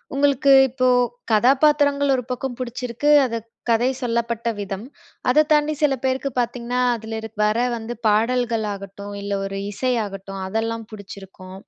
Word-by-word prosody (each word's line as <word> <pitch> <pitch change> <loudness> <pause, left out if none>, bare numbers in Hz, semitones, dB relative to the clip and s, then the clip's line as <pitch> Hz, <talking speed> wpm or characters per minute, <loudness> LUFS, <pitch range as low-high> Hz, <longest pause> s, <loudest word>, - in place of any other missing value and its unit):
உங்களுக்கு 280 -1 +3 0.2
இப்போ 255 0 0 0.4
கதாபாத்திரங்கள் 280 +4 +3
ஒரு 250 - -2
பக்கம் 250 0 -4
பிடிச்சிருக்கு 250 +3 -2 0.2
அது 230 -2 -2 0.3
கதை 235 +2 +3
சொல்லப்பட்ட 235 -1 -2
விதம். 195 +2 -5 0.4
அதை 300 +4 +5
தாண்டி 300 0 +3
சில 285 -2 +4
பேருக்கு 265 +1 0
பாத்தீங்கன்னா, 245 +1 -1
அதில 220 0 -6
இரு 225 - -7 0.2
வர 215 +2 +1 0.2
வந்து 230 +2 -6
பாடல்கள் 230 +1 +1
ஆகட்டும் 200 +1 -9
இல்ல, 200 - -5
ஒரு 195 0 -4
இசை 255 +4 -1
ஆகட்டும் 195 -1 -7
அதெல்லாம் 225 +2 -3
பிடிச்சிருக்கும். 195 -2 -11
235 Hz, 140 wpm, -22 LUFS, 210-260 Hz, 0.4 s, அதை